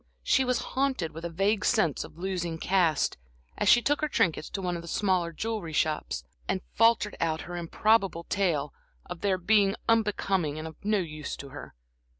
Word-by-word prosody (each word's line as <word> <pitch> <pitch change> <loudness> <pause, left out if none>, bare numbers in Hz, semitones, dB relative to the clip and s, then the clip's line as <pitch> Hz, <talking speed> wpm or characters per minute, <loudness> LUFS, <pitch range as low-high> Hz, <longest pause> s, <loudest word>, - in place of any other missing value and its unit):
She 265 - +3
was 250 -1 +1 0.2
haunted 260 - 0
with 165 +2 -9
a - - -2
vague 195 +5 +1
sense 175 - +2
of - - -13
losing 175 -2 -3
caste, 175 -2 +1 0.4
as - - +1
she 240 - +6
took 290 +2 +1
her 305 - +1
trinkets 165 - 0
to - - -4
one 180 -2 -2
of 170 - -5
the 170 - -11
smaller 180 -2 +1
jewelry 210 -2 -4
shops, 155 0 -1 0.3
and 190 -1 0
faltered 225 -2 +3
out 160 -1 0
her 175 - -7
improbable 190 +1 +1
tale 165 -7 0 0.3
of 180 -1 -8
their 195 -2 +2
being 200 +2 +3
unbecoming 195 -8 +1
and 155 +1 -5
of 160 - -10
no 210 +1 +2
use 155 -5 -4
to 140 - -9
her. 135 - -10
185 Hz, 185 wpm, -28 LUFS, 165-210 Hz, 0.4 s, she